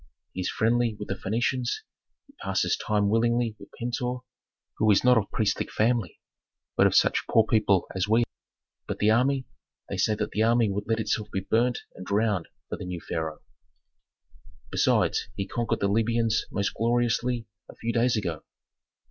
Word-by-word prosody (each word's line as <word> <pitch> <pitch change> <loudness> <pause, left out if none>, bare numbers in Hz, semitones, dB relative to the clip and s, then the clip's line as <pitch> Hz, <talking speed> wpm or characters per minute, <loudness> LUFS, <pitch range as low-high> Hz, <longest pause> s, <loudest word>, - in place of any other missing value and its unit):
"He 95 - -3
is 90 - -1
friendly 115 0 +1
with 105 - -7
the - - 0
Phœnicians; 120 +6 -1 0.4
he - - -22
passes - - +1
time 105 -1 0
willingly 115 +1 +1
with - - -12
Pentuer, 125 +1 -2 0.6
who 110 - +3
is 100 - +5
not 125 0 +6
of 105 -4 +1
priestly 110 - 0
family, 115 -5 0 0.6
but - - +5
of - - 0
such - - +3
poor 115 -1 +5
people 105 -5 +3
as 95 +1 -1
we. 115 +2 +4 0.6
But - - -3
the 105 +1 +3
army, 130 +3 +2 0.4
they 100 - -3
say 105 +3 +2
the 105 0 -2
army 115 -1 +3
would 100 +1 -3
let 115 0 +1
itself 110 -1 -1
be 95 - -1
burnt 115 +5 +1
and 95 - -9
drowned 100 -2 0 0.2
for - - -4
the - - -6
new 90 -1 -4
pharaoh." 80 -2 -4 1.3
"Besides, - - +2
he 100 - -2
conquered 120 +3 -2
the 100 - +3
Libyans 115 +1 +1
most 100 0 -1
gloriously 120 0 0 0.2
a - - -11
few 115 +1 -3
days 120 0 +2
ago." 85 -7 -3
110 Hz, 170 wpm, -27 LUFS, 100-120 Hz, 1.3 s, not